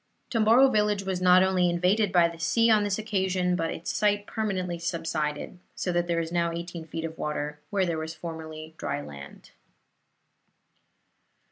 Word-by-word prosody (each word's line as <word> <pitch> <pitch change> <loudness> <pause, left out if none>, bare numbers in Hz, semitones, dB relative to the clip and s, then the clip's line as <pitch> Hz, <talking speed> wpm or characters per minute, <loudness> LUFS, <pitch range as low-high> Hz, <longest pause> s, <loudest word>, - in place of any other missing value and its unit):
Tomboro 230 +3 +5
village 210 -4 +1
was 190 -2 -2
not 180 0 +6
only 185 -2 +2
invaded 185 +4 +2
by 175 -2 +5
the 170 -1 -9
sea 230 +8 +3
on 215 -1 +5
this 205 -1 0
occasion, 190 -4 0
but 165 -2 -1
its 165 - -4
site 205 -1 +1
permanently 185 -6 -2
subsided; 165 -1 -3 0.2
so 180 - -2
that 175 0 0
there 170 -1 +1
is 165 0 -3
now 170 -1 +1
eighteen 170 -1 -6
feet 165 +1 -4
of 165 0 -7
water 150 0 -3
where 195 -2 +1
there 165 -2 -2
was 160 +1 -5
formerly 160 -1 -8
dry - - -2
land. 70 -1 -11
175 Hz, 165 wpm, -27 LUFS, 165-195 Hz, 0.2 s, not